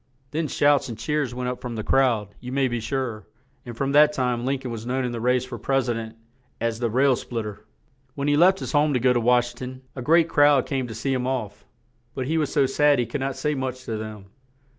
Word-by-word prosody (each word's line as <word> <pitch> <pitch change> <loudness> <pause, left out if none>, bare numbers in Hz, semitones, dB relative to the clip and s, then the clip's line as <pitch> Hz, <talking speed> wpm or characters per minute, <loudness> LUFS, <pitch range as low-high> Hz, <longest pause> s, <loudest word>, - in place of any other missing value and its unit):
Then 155 +1 -1
shouts 145 -2 +2
and 115 - -6
cheers 135 +2 -2
went 125 0 -3
up 125 0 -4
from 125 -2 -5
the 110 - -4
crowd, 120 -7 +2
you 125 +1 -8
may 135 0 +2
be 120 -1 -2
sure; 115 -2 -3 0.4
and 120 -1 -7
from 135 +2 -1
that 150 +1 +6
time 125 -3 -1
Lin 135 +1 +1
coln 130 -2 -7
was 115 -1 -5
known 130 +2 -1
in 125 - -2
the 115 -1 -5
race 125 +1 +2
for 120 -2 -8
pres 135 +2 0
i - - +1
dent 115 -1 -6 0.4
as 115 0 -1
"The 120 -1 0
Rail 130 +3 +3
Split 115 -2 -4
ter." 105 0 -8 0.5
When 140 0 -2
he 145 - +3
left 185 +5 +4
his - - -4
home 150 -1 +2
to - - +2
go 125 +1 +3
to 120 - +2
Wash 120 +1 +3
ing - - -22
ton, 130 0 -7
a 130 - -5
great 165 +5 +4
crowd 145 -4 +4
came 135 -3 -2
to 110 - -7
see 135 +5 -1
him 125 -1 -1
off, 105 -6 -4 0.5
but 130 - -2
he 160 +4 0
was 150 - -1
so 140 -2 +3
sad 145 +2 +3
he 120 - +1
could 125 +5 -4
not 135 0 -2
say 150 0 -1
much 130 -2 -4
to 115 - -3
them. 105 -2 -8
130 Hz, 260 wpm, -24 LUFS, 120-140 Hz, 0.5 s, that